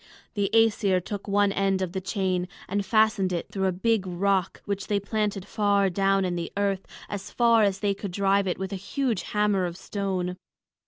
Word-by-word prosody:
The 200 -2 0
Æsir 215 -4 +3
took 205 -1 -5
one 200 0 +3
end 195 -1 +1
of 180 - -3
the 190 +1 -3
chain 185 -2 -1 0.2
and 200 +2 -1
fastened 215 -1 +2
it 175 -2 -3
through 190 -1 0
a - - +2
big 195 +1 0
rock 190 +1 0
which 200 -1 -3
they 205 -1 +1
planted 205 -1 -2
far 200 -2 +2
down 195 +1 +2
in 180 -1 -1
the 170 -1 -4
earth, 200 -1 0 0.2
as 200 -1 -6
far 235 -2 +4
as 200 -2 +1
they 205 -1 +2
could 200 0 -6
drive 195 +1 +2
it 180 - -1
with 190 +1 -4
a - - -2
huge 230 +1 -1
hammer 205 -2 +1
of 175 0 -7
stone. 190 -3 -3
195 Hz, 200 wpm, -26 LUFS, 190-205 Hz, 0.2 s, far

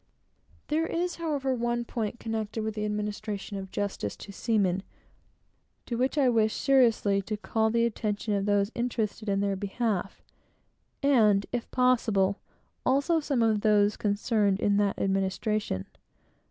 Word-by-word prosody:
There 320 +2 +1
is, 350 +1 -2
however, 290 -5 -1
one 240 -1 -1
point 230 -1 -3
connected 220 -1 -3
with 220 0 -2
the 210 0 -3
administration 210 -1 -4
of 190 -1 -6
justice 195 - -3
to 200 - -9
seamen, 195 -3 +1 1.0
to 240 - -3
which 260 +5 0
I 275 -3 +4
wish 220 -3 +2
seriously 230 -7 +3
to 210 +2 -4
call 220 +1 0
the 230 +1 +2
attention 210 -2 -2
of 200 0 0
those 205 +1 +2
interested 225 -3 -2
in 195 0 +1
their 200 -1 0
behalf, 200 0 -2 0.8
and, 215 -8 +4
if 240 -1 -3
possible, 220 -6 +2 0.4
also 280 +6 +2
of 310 - -3
some 260 -5 +1
of 215 -2 +2
those 210 -1 +3
concerned 205 -1 +1
in 205 -1 +2
that 205 -1 +1
administration. 195 - -1
215 Hz, 145 wpm, -28 LUFS, 200-240 Hz, 1.0 s, I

